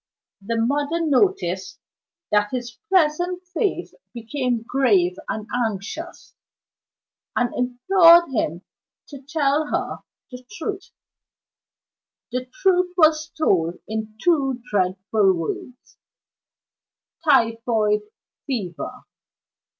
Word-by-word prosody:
The 230 +4 -2
mother 285 +7 0
noticed 380 +8 +1 0.5
that 210 0 +3
his 240 -1 -5
pleasant 355 0 +2
face 360 +2 -2 0.2
became 240 0 -2
grave 210 -9 +2
and 215 -1 -3 0.2
anxious, 225 - -6 1.0
and 245 -1 0
implored 335 +8 +5
him 175 -7 -2 0.5
to 280 -3 -10
tell 295 +1 0
her - - -2 0.3
the 250 0 -9
truth. 385 +3 -5 1.4
The 250 +1 -2
truth 360 +5 +1
was 310 -2 +4
told 180 - +1
in 220 0 -5
two 270 -6 +1
dreadful 195 +1 +2
words: 180 +8 -6 1.3
"Typhoid 230 -6 +2 0.5
Fever." 185 - -4
250 Hz, 90 wpm, -22 LUFS, 215-315 Hz, 1.4 s, implored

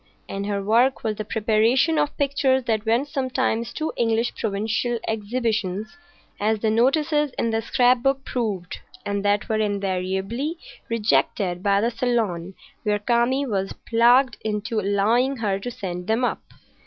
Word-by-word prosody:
And 200 +1 -4
her 200 -1 -2
work 235 +6 +3
was 215 -1 -1
the 215 - -3
preparation 225 +8 +2
of 290 - -1
pictures 275 -2 +2
that 220 -2 -1
went 235 +6 +2
sometimes 255 -5 -1
to 315 0 -3
English 230 0 +1
provincial 220 +3 -1
exhibitions, 220 - -2 0.4
as 215 +2 +1
the 215 +1 0
notices 295 +4 +2
in 230 - 0
the 225 0 0
scrap 245 +2 +3
book 270 0 0
proved, 205 -8 -3 0.3
and 200 0 -2
that 205 0 +1
were 220 -1 0
invariably 200 - -2 0.3
rejected 210 -5 +1
by 200 0 +2
the 235 +2 +1
Salon 215 -8 -1 0.3
when 210 -1 +1
Kami 240 +5 +2
was 195 -5 -2
plagued 240 +2 +4
into 215 +1 -2
allowing 215 +7 +2
her 200 -4 -1
to 220 - -5
send 180 -5 -6
them 225 +3 +1
up. - - -2
225 Hz, 150 wpm, -23 LUFS, 205-250 Hz, 0.4 s, plagued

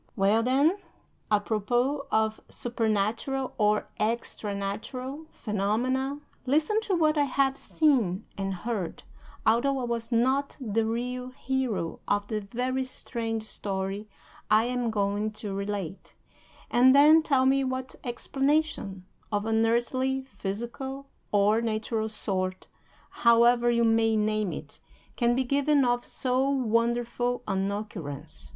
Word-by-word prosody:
Well, 205 +2 +3
then, 275 - +3 0.5
apropos 240 +7 +1
of 220 -2 +1
supernatural, 230 +3 -1
or 210 0 +2
extra 215 -2 -1
natural, 255 +9 -5
phenomena, 250 +7 -1 0.3
listen 310 +11 +2
to 405 -4 0
what 310 -2 +3
I 290 - +4
have 270 0 +1
seen 245 - +1
and 195 0 -2
heard, 200 -3 -4 0.4
although 250 +5 +3
I 260 - -2
was 235 0 -3
not 260 +4 +1
the 225 -3 0
real 250 +2 -3
hero 255 -9 -2
of 205 0 +1
the 215 -1 -1
very 250 +5 -2
strange 230 -3 -3
story 200 0 -4 0.4
I 215 +1 +5
am 245 -1 -1
going 205 0 0
to 210 -2 -6
relate, 200 -2 -4 0.6
and 255 +2 +6
then 305 +3 +8
tell 270 -4 +2
me 270 +1 +3
what 260 0 -3
explanation 270 -6 -1 0.3
of 205 0 0
an 225 0 +2
earthly, 255 +3 +1
physical, 265 +4 -6 0.2
or 210 +2 +3
natural 220 0 -1
sort, 185 -3 -2 0.6
however 235 +1 +5
you 235 0 +3
may 225 -1 +3
name 215 -2 +1
it, - - -8 0.4
can 240 -1 +2
be 260 - +2
given 280 +1 +2
of 245 0 +1
so 260 +1 0
wonderful 240 -1 0
an 195 +1 0
occurrence. 145 - -6
235 Hz, 125 wpm, -28 LUFS, 210-265 Hz, 0.6 s, then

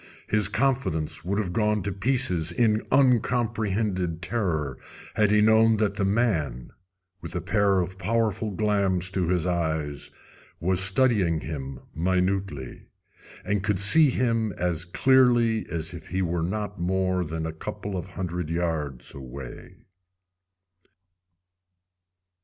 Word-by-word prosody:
His 105 -2 +1
confidence 95 - -1
would 95 +4 -1
have 95 -5 -2
gone 105 -1 +1
to 100 - -2
pieces 100 -6 0
in 110 +2 +2
uncomprehended 110 -8 +1
terror 85 - -2 0.3
had 105 -1 +3
he 105 0 +4
known 110 +1 +5
that 105 -2 +1
the 100 -1 -2
man, 90 - 0 0.5
with 85 - -8
a - - 0
pair 100 +1 +2
of 95 +2 -3
powerful 110 -1 0
glams 100 -3 0
to 95 -3 -1
his 90 -2 +1
eyes, 80 -5 -2 0.5
was 90 +1 +1
studying 95 -5 +2
him 70 -4 -6
minutely, 90 -4 -1 0.6
and 105 +1 0
could 100 -3 0
see 145 +10 +6
him 115 -4 0
as 85 -1 -1
clearly 120 +1 +3
as 80 0 -3
if 80 -2 -10
he 95 +2 -1
were 85 -1 -1
not 105 +3 -3
more 95 0 0
than 80 0 -4
a 80 - -4
couple 95 +5 -6
of 90 0 -4
hundred 90 -3 -4
yards 80 -6 -3
away. 65 -1 -10
95 Hz, 130 wpm, -26 LUFS, 85-110 Hz, 0.6 s, see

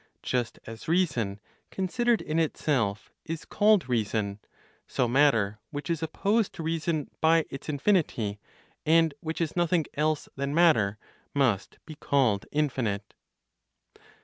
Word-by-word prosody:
Just 125 -2 -1
as 115 0 -9
reason, 125 - +1 0.3
considered 230 +5 0
in 155 +2 -1
itself, 130 -10 0
is 165 0 -5
called 205 - +3
reason, 105 -4 -1 0.5
so 125 - 0
matter, 115 -6 +3
which 145 +2 -4
is 165 -2 -1
opposed 200 +7 0
to 165 - -6
reason 160 -2 -1
by 160 0 +4
its 135 - -7
infinity, 145 - +1 0.4
and 165 -1 +4
which 160 +1 -4
is 165 -3 -1
nothing 175 -2 +2
else 155 0 0
(than 140 +1 -2
matter), 115 -13 +4 0.4
must 115 -9 +1
be 155 - -8
called 130 -9 +1
infinite. 120 -9 -1
150 Hz, 125 wpm, -28 LUFS, 115-165 Hz, 0.5 s, by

